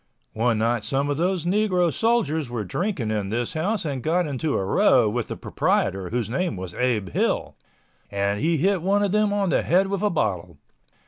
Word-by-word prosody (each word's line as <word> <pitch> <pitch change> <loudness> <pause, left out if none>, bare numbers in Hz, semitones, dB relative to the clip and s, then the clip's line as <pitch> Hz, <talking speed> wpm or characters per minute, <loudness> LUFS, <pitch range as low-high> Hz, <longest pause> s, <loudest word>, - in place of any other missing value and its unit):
One 115 0 +1
night 115 0 0
some 140 +3 -1
of 145 - -1
those 175 0 0
negro 180 -3 +2
soldiers 190 - +1
were 120 -3 -3
drinking 140 - -2
in 105 -3 -2
this 120 +2 -2
house 190 +5 -1
and 140 -4 -3
got 170 +7 +1
into 145 +1 -1
a 95 - -1
row 125 - +4
with 115 +2 -2
the - - -6
proprietor, 95 -1 -1
whose 120 -1 -1
name 170 - -1
was 90 -1 -6
Abe 115 -7 0
Hill, - - -1 0.5
and 100 0 -1
he 165 +2 +1
hit 190 +4 +1
one 200 +3 +2
of 200 - 0
them 210 0 +2
on 200 -3 0
the - - +2
head 190 +3 +2
with 200 -1 -2
a 210 - +2
bottle. 95 - -2
150 Hz, 200 wpm, -24 LUFS, 115-190 Hz, 0.5 s, row